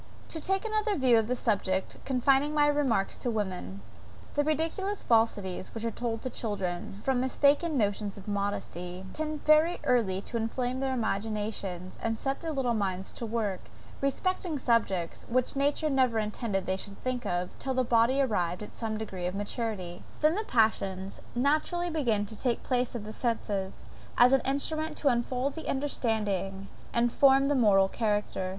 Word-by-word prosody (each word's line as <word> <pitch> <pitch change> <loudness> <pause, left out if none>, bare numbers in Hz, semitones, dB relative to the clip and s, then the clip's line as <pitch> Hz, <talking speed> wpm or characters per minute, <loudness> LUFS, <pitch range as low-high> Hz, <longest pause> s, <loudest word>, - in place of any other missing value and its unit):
To 320 - -3
take 385 +5 0
another 430 -1 +1
view 255 -4 +5
of 220 - -1
the 250 - 0
subject, 195 -5 0
confining 270 +3 +2
my 295 -1 +5
remarks 275 -9 +1
to 245 - -2
women. 185 - -3 0.5
The 290 - +2
ridiculous 325 +7 -1
falsities 210 -5 +1
which 225 0 -4
are 230 - 0
told 230 -1 -3
to 255 - -2
children, 195 -2 -3
from 265 -2 +2
mistaken 285 +4 +3
notions 205 -2 0
of 195 - -11
modesty, 190 -3 -3
tend 310 -1 -4
very 310 +3 +5
early 215 -7 +2
to 235 - -4
inflame 245 +3 -1
their 265 -1 0
imaginations 205 -4 -3
and 225 0 -1
set 270 +3 -2
their 325 -1 -3
little 265 -5 0
minds 190 -3 -2
to 235 - -6
work, 215 -4 -1 0.4
respecting 335 +3 0
subjects, 225 -9 0
which 255 +2 +1
nature 285 +3 +1
never 260 -5 +2
intended 210 -2 -1
they 190 - 0
should 200 +1 -8
think 255 -1 -1
of, 180 0 -1
till 265 -1 -2
the 255 - +3
body 240 +3 +3
arrived 180 -6 -1
at - - -10
some 220 -2 -3
degree 190 -5 -4
of 180 - -3
maturity; 205 -4 -3 0.2
then 305 +1 +5
the 425 +4 -1
passions 195 - +1
naturally 310 +7 +1
begin 235 -10 +1
to 220 - -6
take 240 +2 -1
place 250 -1 0
of 230 - -4
the 215 +1 -7
senses, 210 -6 -2 0.3
as 250 +2 +7
instruments 300 +4 0
to 285 - +3
unfold 250 +2 0
the 320 - -6
understanding, 210 -8 -1 0.2
and 235 0 +2
form 275 0 +6
the 290 - +2
moral 205 -7 +5
character. 205 -3 -1
235 Hz, 170 wpm, -29 LUFS, 200-275 Hz, 0.5 s, as